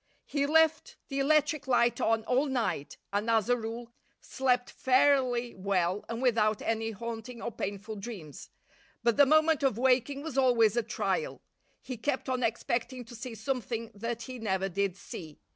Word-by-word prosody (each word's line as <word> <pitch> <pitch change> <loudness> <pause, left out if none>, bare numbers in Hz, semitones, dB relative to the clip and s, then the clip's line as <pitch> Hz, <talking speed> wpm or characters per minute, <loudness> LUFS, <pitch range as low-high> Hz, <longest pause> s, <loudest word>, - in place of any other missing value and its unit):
He 285 -1 0
left 320 +1 +3
the 275 -1 -2
electric 300 0 +2
light 240 -2 +3
on 225 0 +2
all 265 +5 +2
night 235 - -2 0.2
and, 205 +3 0
as 225 -1 +2
a 245 - +5
rule, 230 0 -6 0.3
slept 250 -2 0
fairly 255 -2 +2
well 190 0 0
and 230 +2 -3
without 215 -4 +3
any 225 0 -1
haunting 230 +2 -6
or 235 - -4
painful 205 +1 -5
dreams. 195 - -8 0.5
But 235 -1 +3
the 285 -1 +6
moment 310 +1 +4
of 270 -6 +1
waking 265 +3 +2
was 295 -4 -1
always 235 -5 +4
a 240 - +3
trial. 465 - -2 0.4
He 255 -2 -6
kept 265 +3 -2
on 255 -1 0
expecting 240 +2 -1
to 240 - -11
see 240 0 -7
something 230 -1 -3
that 230 +3 -4
he 255 -1 -7
never 195 -3 -1
did 195 0 -1
see. 155 -6 -9
235 Hz, 165 wpm, -30 LUFS, 220-265 Hz, 0.5 s, the